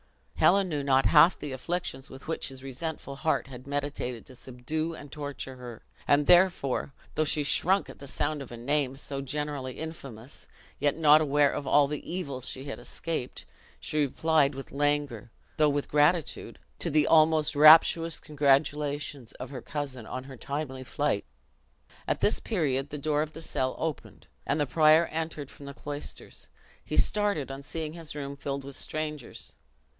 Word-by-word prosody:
Helen 195 0 +4
knew 150 -3 -1
not 135 -1 +3
half 165 +3 +6
the 145 - -6
afflictions 135 -1 -4
with 130 - -12
which 165 - -2
his 130 0 -9
resentful 140 +1 -5
heart 155 +3 0
had 130 -1 -11
meditated 140 -4 -3
to 130 - -13
subdue 145 +7 -4
and 145 -2 -11
torture 145 -3 -6
her; 120 -3 -9 0.2
and 145 +1 +4
therefore, 175 -6 +3 0.2
though 155 - +1
she 150 0 +2
shrunk 190 +7 +2
at - - -12
the 140 - -10
sound 150 +2 -2
of 135 - -9
a 120 - -7
name 135 +2 0
so 135 0 -4
generally 140 -1 -3
infamous, 135 -6 -8 0.3
yet, 145 0 +1
not 155 -1 +6
aware 145 -1 +3
of 140 - -4
all 145 0 +5
the 150 0 -4
evils 140 -8 -4
she 130 - -5
had 140 - -6
escaped, 160 -7 -5 0.3
she 155 - -2
replied 145 0 +2
with 135 - -8
languor, 145 -5 -1 0.3
though 155 -1 +4
with 145 0 -1
gratitude, 150 +2 +1 0.2
to - - -1
the 150 0 +3
almost 155 -1 +4
rapturous 160 +2 +7
congratulations 145 -2 0
of 125 +2 -8
her 130 -3 -6
cousin 135 -6 -5
on 130 - -5
her 135 -1 -11
timely 140 -1 -4
flight. - - -1 0.8
At - - -1
this 210 - +3
period 145 - -1
the 150 - -5
door 150 +1 0
of 155 0 -3
the 160 - -9
cell 130 -4 -2
opened, 160 -2 -5 0.2
and 145 - +1
the 145 - +2
prior 155 +4 +5
entered 160 -3 -4
from 140 - -12
the 140 - -8
cloisters 145 0 -7 0.4
he - - -4
started 205 -10 +2
on 135 +1 -7
seeing 155 +2 -5
his 165 -3 -7
room 140 -1 -5
filled 140 0 -4
with 140 0 -8
strangers. 150 -4 -5
145 Hz, 170 wpm, -28 LUFS, 135-155 Hz, 0.8 s, rapturous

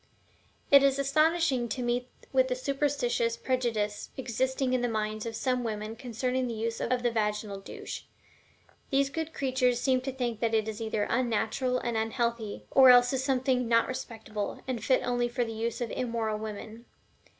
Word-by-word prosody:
It 280 -1 +9
is 275 -1 +3
astonishing 285 -2 +2
to 245 +3 -3
meet 245 +1 0 0.3
with 260 -1 +4
the 250 - -1
superstitious 255 -4 0
prejudice 230 -5 -1
existing 260 +1 -1
in 255 - +2
the 245 - +1
minds 215 0 -2
of 225 - -5
some 250 +1 0
women 215 -1 -4
concerning 250 +2 -2
the 235 - -4
use 225 +1 -3
of 250 0 0
the 240 - +2
vaginal 210 -2 -1
douche; 195 - -8 0.8
these 275 0 +2
good 320 +1 -3
creatures 255 -4 +1
seem 255 0 +2
to 270 +1 -3
think 245 -4 -3
that 230 -1 +1
it 220 -1 +1
is 220 +1 -5
either 220 -2 -1
unnatural 250 +1 0
and 235 -2 -2
unhealthy, 225 -1 -2
or 265 -1 +8
else 245 +1 +7
is 265 0 0
something 255 -2 +1
"not 230 0 +3
respectable," 220 -5 -5
and 245 -4 -3
fit 260 +2 +3
only 245 -1 0
for 240 +1 0
the 225 - -5
use 230 +2 -3
of 240 - -2
immoral 230 -3 -2
women. 220 +2 -7
245 Hz, 175 wpm, -29 LUFS, 225-260 Hz, 0.8 s, It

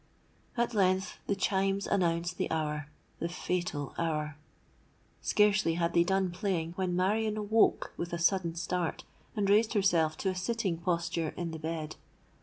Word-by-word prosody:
"At 240 0 +1
length 190 -2 +1
the 200 - +1
chimes 195 0 +1
announced 175 -2 0
the - - 0
hour—the 155 +1 -4
fatal 175 -5 -2
hour! 150 -2 -1 0.9
Scarcely 210 -5 +3
had 170 0 0
they 170 - +5
done 190 0 +1
playing, 175 -3 -1
when 180 0 -1
Marion 210 +4 +1
awoke 215 +1 +2
with 170 - -4
a 170 - -1
sudden 170 -1 +2
start, 175 -1 -2 0.3
and 205 -2 +1
raised 215 +3 +4
herself 170 -6 +3
to 195 - 0
a 185 - -2
sitting 190 -3 -1
posture 170 -2 -1
in 170 -2 -3
the 160 - -6
bed. 160 -1 -4
180 Hz, 150 wpm, -31 LUFS, 165-195 Hz, 0.9 s, they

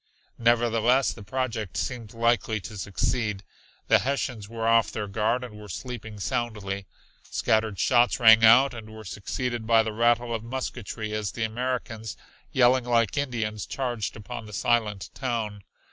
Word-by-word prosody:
Nevertheless 120 +2 +3
the 110 - -12
project 110 -2 -3
seemed 115 -4 -4
likely 115 -1 +1
to 105 - -8
succeed. 105 +1 -1 0.4
The - - +6
Hessians 130 -6 -2
were 115 0 -3
off 115 0 +4
their 105 -2 -4
guard 110 +5 0
and 105 -4 -9
were 105 - -11
sleeping 110 0 -7
soundly. 100 -3 -3 0.4
Scattered 110 -2 +1
shots 120 +4 +3
rang 110 -1 +8
out 120 +5 +7
and 110 -2 -9
were 110 0 -10
succeeded 115 +4 -4
by 115 -1 +5
the 110 -1 -4
rattle 120 +1 +2
of 115 -1 -3
musketry 115 -3 -5
as 105 -2 -2
the 115 - -2
Americans, 115 -1 -3 0.3
yelling 125 0 +4
like 115 -5 +2
Indians 115 -7 -2
charged 120 -6 -3
upon 115 +1 -7
the 105 - -11
silent 105 -3 0
town. 115 -6 -3
115 Hz, 150 wpm, -26 LUFS, 105-120 Hz, 0.4 s, rang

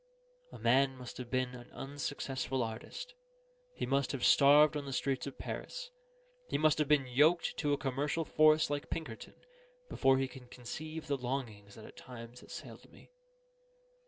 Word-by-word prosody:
A - - -9
man 135 +3 +3
must 125 -1 -9
have 125 -2 -7
been 130 0 0
an 120 -1 -11
unsuccessful 135 -2 -3
artist; 115 - -6 0.6
he - - -2
must 140 -1 +1
have 135 - -1
starved 150 +2 +7
on 145 -1 -3
the 135 - -5
streets 135 0 -1
of 140 - -7
Paris; - - -6 0.6
he - - 0
must 155 0 +3
have 150 - +2
been 145 -2 +4
yoked 150 +7 +3
to 145 -2 0
a 145 - +3
commercial 145 +5 -1
force 155 -1 +4
like 145 0 -3
Pinkerton, 155 -9 -6 0.5
before 135 -1 +3
he 135 0 0
can 130 -1 -12
conceive 155 +7 -7
the 140 -1 -1
longings 120 -6 -4
that 110 - -11
at - - -14
times 120 -1 -10
assailed - - -10
me. - - -18
135 Hz, 165 wpm, -33 LUFS, 125-150 Hz, 0.6 s, starved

